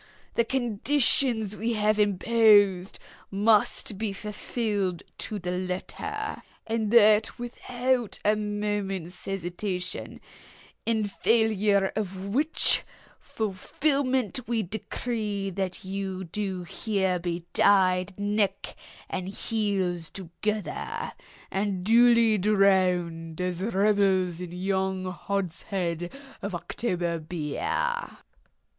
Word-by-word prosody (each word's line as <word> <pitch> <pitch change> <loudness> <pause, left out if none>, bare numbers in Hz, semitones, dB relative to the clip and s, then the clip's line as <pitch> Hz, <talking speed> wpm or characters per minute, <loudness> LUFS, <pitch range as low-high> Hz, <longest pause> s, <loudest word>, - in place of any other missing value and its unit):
The 235 - +3
conditions 240 -2 +2
we 225 +3 -1
have 215 0 +2
imposed 205 -2 +4 0.3
must 205 0 +2
be 215 -2 -1
fulfilled 205 -3 -2 0.2
to 215 - -4
the 180 -2 -4
letter, 185 - -4 0.2
and 220 -1 -1
that 215 -1 +5
without 245 0 -1
a 210 +1 +4
moment's 205 -4 -2
hesitation—in 195 +3 -4
failure 205 -2 +2
of 195 -2 -4
which 300 +5 +3 0.4
fulfilment 255 +4 -1
we 230 -2 0
decree 210 0 -3
that 190 0 -4
you 190 -1 -4
do 190 0 -4
here 190 -1 -1
be 170 0 -3
tied 185 -1 +3
neck 205 -1 0 0.3
and 185 0 -4
heels 195 -6 -1
together, 200 +3 -4 0.4
and 195 -2 -1
duly 230 0 +5
drowned 180 -5 +2
as 180 -1 -2
rebels 195 -4 +2
in 180 -2 -6
yon 190 +1 -1
hogshead 180 -2 -3 0.3
of 200 -2 -3
October 175 -3 -2
beer!" 405 - -2
200 Hz, 90 wpm, -27 LUFS, 185-220 Hz, 0.4 s, that